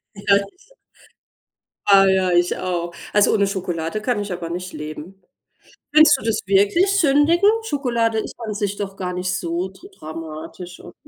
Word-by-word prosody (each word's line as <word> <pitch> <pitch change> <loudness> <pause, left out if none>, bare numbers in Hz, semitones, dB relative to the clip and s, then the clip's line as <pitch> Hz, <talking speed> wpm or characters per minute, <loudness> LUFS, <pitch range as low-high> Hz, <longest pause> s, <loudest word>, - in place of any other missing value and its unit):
Ja 200 0 +2
sicher. 365 - -9 1.1
Ah 195 -1 +7
ja, 190 -1 +2
ich 175 0 +2
auch. 175 -2 -3 0.2
Also, 210 0 +4
ohne 200 -2 +2
Schokolade 180 -1 -3
kann 240 0 -1
ich 205 -1 -5
aber 175 -2 -5
nicht 180 +2 -6
leben. 155 +5 -8 0.7
Nennst 305 -1 +7
du - - -11
das 225 -1 0
wirklich 205 - +3
sündigen? 325 +5 +4
Schokolade 235 - 0
ist - - -6
an 220 -2 -4
sich 205 -1 -2
doch 195 -1 -5
gar 180 -2 -4
nicht 180 +1 -2
so 175 +1 -3
dr 330 - -16
dramatisch, 165 - -9
oder? - - -13
195 Hz, 160 wpm, -21 LUFS, 180-230 Hz, 1.1 s, Ah